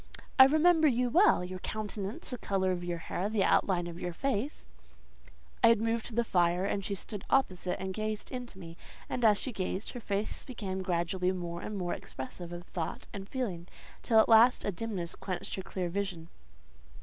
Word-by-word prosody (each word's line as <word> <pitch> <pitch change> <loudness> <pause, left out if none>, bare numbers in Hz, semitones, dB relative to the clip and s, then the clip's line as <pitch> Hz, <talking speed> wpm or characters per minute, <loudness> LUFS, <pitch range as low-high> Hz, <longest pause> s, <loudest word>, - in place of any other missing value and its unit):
"I 265 - +12
remember 315 +3 +5
you 250 -2 +2
well—your 185 - +4
countenance, 210 +1 -4
the 250 - -4
colour 190 -1 0
of 175 -1 -2
your 175 -1 -2
hair, 180 +4 -3
the 215 -3 +2
outline 180 -2 +3
of 170 0 -7
your 175 -1 -3
face…." 270 - -2 1.0
I - - +9
had 230 -2 +6
moved 225 0 0
to 230 - -8
the 235 - +3
fire, 175 -3 +2
and 200 0 -1
she 200 +1 -2
stood 200 +1 -7
opposite, 185 -9 +1
and 190 0 -3
gazed 215 +1 -3
into 250 -5 -6
me; 165 -2 -10 0.3
and 245 - -3
as 210 -2 +6
she 260 - -3
gazed, 190 -1 -3
her 245 - -6
face 205 -1 -3
became 195 -7 -4
gradually 180 +1 0
more 175 -2 -4
and 215 - -5
more 175 -2 -1
expressive 170 +7 -7
of 175 0 -6
thought 175 -2 -5
and 195 0 -7
feeling, 190 -10 -3 0.3
till 225 - +2
at - - +5
last 230 +2 +6
a 205 - +1
dimness 190 -3 -4
quenched 190 +1 -5
her 190 - -2
clear 185 -1 -3
vision. 175 -3 -3
195 Hz, 190 wpm, -31 LUFS, 180-225 Hz, 1.0 s, I